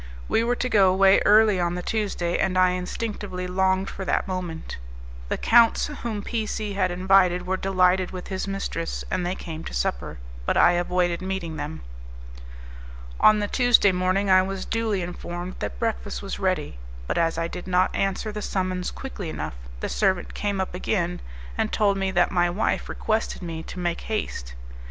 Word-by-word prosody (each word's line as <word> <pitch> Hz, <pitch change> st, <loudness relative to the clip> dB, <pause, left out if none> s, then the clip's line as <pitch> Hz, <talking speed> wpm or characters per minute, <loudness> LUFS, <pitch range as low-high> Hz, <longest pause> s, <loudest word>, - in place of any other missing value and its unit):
We 225 Hz, -, +2 dB
were 240 Hz, +1 st, +1 dB
to 255 Hz, -, -1 dB
go 200 Hz, -6 st, +5 dB
away 195 Hz, +1 st, +5 dB
early 210 Hz, -2 st, +6 dB
on 175 Hz, 0 st, 0 dB
the 180 Hz, -, -4 dB
Tuesday, 195 Hz, -6 st, -1 dB
and 185 Hz, -1 st, +1 dB
I 185 Hz, 0 st, +5 dB
instinctively 185 Hz, 0 st, -4 dB
longed 190 Hz, +1 st, +1 dB
for 195 Hz, -, -6 dB
that -, -, 0 dB
moment. 180 Hz, -3 st, -5 dB, 0.5 s
The -, -, 0 dB
counts 230 Hz, -1 st, +5 dB, 0.2 s
whom 215 Hz, -4 st, -3 dB
P 225 Hz, -1 st, -2 dB
C 210 Hz, -1 st, -3 dB
had 190 Hz, -2 st, +1 dB
invited 180 Hz, 0 st, +3 dB
were 190 Hz, +1 st, 0 dB
delighted 185 Hz, -1 st, +2 dB
with 185 Hz, -1 st, -8 dB
his 190 Hz, 0 st, -3 dB
mistress, 195 Hz, -4 st, -3 dB
and 185 Hz, -1 st, 0 dB
they 180 Hz, +1 st, -1 dB
came 160 Hz, -3 st, -7 dB
to -, -, -6 dB
supper; -, -, -2 dB, 0.3 s
but -, -, +2 dB
I -, -, +7 dB
avoided 175 Hz, 0 st, 0 dB
meeting 185 Hz, -4 st, -3 dB
them. 150 Hz, +2 st, -5 dB, 1.4 s
On 215 Hz, -, +6 dB
the 205 Hz, -1 st, -1 dB
Tuesday 245 Hz, -4 st, +4 dB
morning 185 Hz, +2 st, +1 dB
I 185 Hz, -1 st, +6 dB
was 190 Hz, 0 st, -4 dB
duly 220 Hz, -5 st, -1 dB
informed 175 Hz, +1 st, -6 dB
that -, -, -4 dB
breakfast 220 Hz, -3 st, -3 dB
was 195 Hz, -, -5 dB
ready, 185 Hz, -, -1 dB, 0.3 s
but -, -, -1 dB
as 165 Hz, -1 st, +1 dB
I 165 Hz, 0 st, 0 dB
did 175 Hz, +1 st, -8 dB
not 185 Hz, 0 st, +2 dB
answer 195 Hz, +2 st, -1 dB
the 210 Hz, 0 st, -5 dB
summons 185 Hz, -2 st, -2 dB
quickly 210 Hz, -10 st, -6 dB
enough -, -, -4 dB, 0.3 s
the -, -, -1 dB
servant 190 Hz, -4 st, 0 dB
came 205 Hz, -1 st, -2 dB
up 190 Hz, -, -2 dB
again, 180 Hz, -1 st, -1 dB, 0.4 s
and -, -, +1 dB
told 205 Hz, -2 st, +2 dB
me 195 Hz, 0 st, -1 dB
that 175 Hz, -2 st, +2 dB
my 175 Hz, -1 st, +2 dB
wife 190 Hz, +6 st, -1 dB
requested 220 Hz, -3 st, -2 dB
me 165 Hz, -2 st, -5 dB
to 170 Hz, -, -9 dB
make 175 Hz, -1 st, -2 dB
haste. -, -, -4 dB
185 Hz, 185 wpm, -25 LUFS, 175-200 Hz, 1.4 s, I